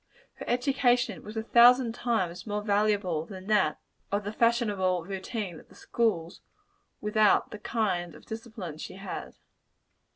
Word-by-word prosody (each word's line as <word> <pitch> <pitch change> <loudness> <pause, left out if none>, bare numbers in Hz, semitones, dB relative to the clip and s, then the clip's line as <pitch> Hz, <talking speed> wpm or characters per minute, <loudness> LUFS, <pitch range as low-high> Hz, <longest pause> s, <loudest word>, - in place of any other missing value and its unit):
Her - - -7
education 245 - +2
was 215 +2 -8
a 220 - -1
thousand 240 +1 +6
times 190 -7 -2
more 210 0 -2
valuable 205 -6 +1
than 190 -2 -9
that 210 -1 +2 0.3
of 205 +1 0
the 205 +2 -4
fashionable 205 -7 +1
routine 195 -1 -5
of - - -19
the - - -18
schools, 185 -8 -1 0.6
without 210 0 +3
the 210 - -7
kind 185 -7 -1
of - - -15
discipline 220 -8 -7
she - - -7
had. 195 +1 -7
210 Hz, 140 wpm, -28 LUFS, 185-230 Hz, 0.6 s, thousand